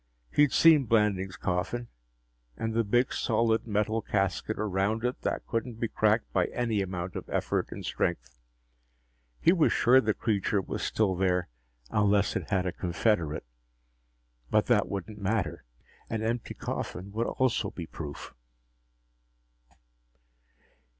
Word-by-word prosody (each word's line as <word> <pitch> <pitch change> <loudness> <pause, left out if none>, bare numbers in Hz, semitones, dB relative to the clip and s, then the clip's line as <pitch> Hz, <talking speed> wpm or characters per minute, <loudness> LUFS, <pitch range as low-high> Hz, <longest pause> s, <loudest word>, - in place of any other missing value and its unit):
He'd 145 -2 +5
seen 155 -4 +6
Blanding's 105 -4 +1
coffin 95 +6 -2 0.7
and 115 0 -2
the 115 +1 +2
big, 120 +5 +2
solid 115 0 +1
metal 110 +1 0
casket 100 +2 -1
around 105 +2 0
it 125 - -2
that - - -2
couldn't 115 +1 -3
be 115 - -1
cracked 110 +1 +1
by 90 -2 +3
any 115 -4 -1
amount 90 -1 -4
of - - -6
effort - - -1
and - - -7
strength. - - -2 1.0
He 170 - +5
was 165 -5 +3
sure 130 +2 +5
the 110 -2 0
creature 105 -2 0
was 95 - -4
still 105 -4 +1
there, 90 -2 +1 0.4
unless 105 -1 +2
it - - -3
had 95 -3 +1
a 90 - 0
confederate. 85 - 0 1.0
But - - +3
that - - +2
wouldn't 100 +2 -5
matter. 110 +3 -1 0.4
An 110 -1 -2
empty 115 +1 -2
coffin 95 +2 -5
would 115 +3 -1
also 120 -5 0
be 85 - -7
proof. 75 -3 -8
105 Hz, 135 wpm, -29 LUFS, 95-115 Hz, 1.0 s, seen